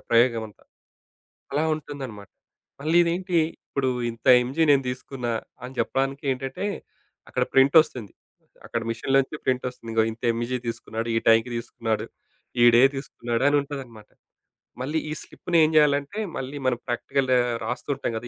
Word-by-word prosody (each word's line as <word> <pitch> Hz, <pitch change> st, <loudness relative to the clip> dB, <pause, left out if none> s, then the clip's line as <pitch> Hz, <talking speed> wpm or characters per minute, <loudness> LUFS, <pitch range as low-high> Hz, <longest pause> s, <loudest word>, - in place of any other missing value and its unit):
ప్రయోగం 115 Hz, -1 st, +4 dB
అంతా. 105 Hz, -, -21 dB, 0.9 s
అలా 145 Hz, +3 st, +1 dB
ఉంటుందన్నమాట. 135 Hz, -9 st, -8 dB, 0.5 s
మళ్ళీ 155 Hz, +3 st, +1 dB
ఇదేంటి? 175 Hz, +1 st, 0 dB, 0.3 s
ఇప్పుడు 135 Hz, -2 st, -1 dB, 0.2 s
ఇంత 115 Hz, +2 st, -14 dB, 0.2 s
ఎంజీ 135 Hz, +7 st, -1 dB
నేను 140 Hz, -1 st, +5 dB
దీసుకున్న, 125 Hz, 0 st, -6 dB, 0.4 s
అని 130 Hz, +1 st, -8 dB
జెప్పడానికి 135 Hz, +1 st, -1 dB
ఏంటంటే, 135 Hz, +6 st, -5 dB, 0.6 s
అక్కడ -, -, 0 dB
ప్రింట్ 135 Hz, +3 st, +5 dB
ఒస్తుంది. 120 Hz, -, -9 dB, 0.5 s
అక్కడ 115 Hz, -, -2 dB
మీషన్‌లోనుంచి 135 Hz, +5 st, 0 dB
ప్రింట్ 130 Hz, 0 st, 0 dB
ఒస్తుంది. 115 Hz, -2 st, -10 dB
ఇగొ 110 Hz, -, +4 dB
ఇంత 115 Hz, -, -15 dB
ఎంజీ 120 Hz, +2 st, -2 dB
తీసుకున్నాడు. 115 Hz, 0 st, -4 dB
ఈ -, -, +5 dB
టైంకి 115 Hz, +2 st, +5 dB
దీసుకున్నాడు. 115 Hz, -2 st, -3 dB, 0.6 s
ఈ -, -, +8 dB
డే 120 Hz, -, +7 dB
తీసుకున్నాడు 120 Hz, -3 st, -3 dB
అని 145 Hz, -, +3 dB
ఉంటాదన్నమాట. 130 Hz, -7 st, -9 dB, 0.7 s
మళ్ళీ 150 Hz, +5 st, -1 dB
ఈ -, -, -1 dB
స్లిప్‌ని 170 Hz, -1 st, -2 dB
ఏం 155 Hz, -, +3 dB
జేయాలంటే, 145 Hz, +6 st, +2 dB, 0.2 s
మళ్ళీ 135 Hz, +2 st, -5 dB
మనం 125 Hz, -, +2 dB
ప్రాక్టికల్ 130 Hz, +2 st, -1 dB, 0.4 s
రాస్తూ 125 Hz, +5 st, -4 dB
ఉంటాం 115 Hz, -, -3 dB
గదా 120 Hz, -, -7 dB
130 Hz, 145 wpm, -25 LUFS, 115-140 Hz, 0.9 s, ఈ